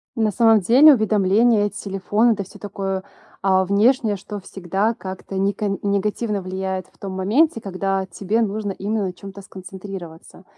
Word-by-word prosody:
На 220 -3 +1
самом 225 0 +5
деле, 265 - +7
уведомления 215 0 +3
от 205 - -3
телефона, 205 +4 +1
это 200 -2 -4
всё - - -15
такое, 195 -2 -4 0.4
а, 190 -1 +3
внешнее, 210 +3 +2
что 205 +2 -7
всегда 195 +3 -2
как-то 190 -2 -7
нека 200 +1 0
негативно 205 +1 -1
влияет 190 0 -3
в - - -30
том 195 -1 -6
моменте, 230 +10 +2
когда 195 0 -2
тебе 205 +4 -1
нужно 205 0 -2
именно 205 +2 -2
на 180 - -5
чём-то 195 +1 -10
сконцентрироваться. 190 -2 -10
200 Hz, 155 wpm, -21 LUFS, 190-215 Hz, 0.4 s, деле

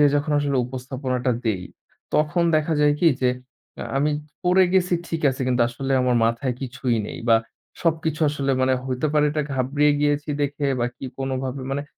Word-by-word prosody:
যে 145 - +7
যখন 145 +1 -1
আসলে 140 -2 0
উপস্থাপনাটা 130 0 -3
দেই 100 -6 0 0.5
তখন 150 +3 +2
দেখা 155 +1 0
যায় 145 0 +4
কী 170 - +6
যে 125 - +4 0.5
আ - - -4
আমি 145 +2 +2 0.3
পড়ে 185 +1 +5
গেছি 180 -1 +3
ঠিক 165 -1 -3
আছে 130 - -7
কিন্তু 125 -1 +2
আসলে 135 +3 -3
আমার 125 -1 +2
মাথায় 115 +2 0
কিছুই 130 -2 -1
নেই। - - -7
বা 115 - +7 0.5
সবকিছু 160 -2 0
আসলে 140 -2 -1
মানে 130 0 +3
হইতে 130 +3 -1
পারে 150 -1 +3
এটা 150 0 -1
ঘাবড়িয়ে 145 +3 +2
গিয়েছি 145 +1 +1
দেখে 145 0 -1
বা 120 - +2
কী - - -9
কোনোভাবে 135 0 -3
মানে 140 +1 -1
140 Hz, 180 wpm, -23 LUFS, 130-150 Hz, 0.5 s, যে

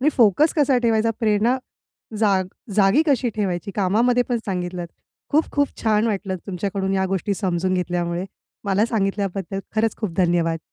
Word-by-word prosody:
आणि 285 - +3
फोकस 240 - +4
कसा 280 -4 +3
ठेवायचा, 225 -1 +2
प्रेरणा 220 +3 +2 0.6
जा 205 -3 +3 0.4
जागी 205 +9 +4
कशी 265 -4 +2
ठेवायची? 195 -1 -2
कामामध्ये 230 +6 +2
पण 245 - +1
सांगितलंत. 180 -2 -3 0.4
खूप-खूप 285 -2 +2
छान 220 0 +2
वाटलं 195 -3 -2
तुमच्याकडून 195 +1 -2
या 190 0 +1
गोष्टी 200 +2 -1
समजून 185 -1 -1
घेतल्यामुळे. 175 0 -1 0.4
मला 200 +2 +2
सांगितल्याबद्दल 195 -3 -2 0.2
खरंच 220 0 +1
खूप 215 -7 -3
धन्यवाद! 170 -2 +2
200 Hz, 140 wpm, -22 LUFS, 185-225 Hz, 0.6 s, फोकस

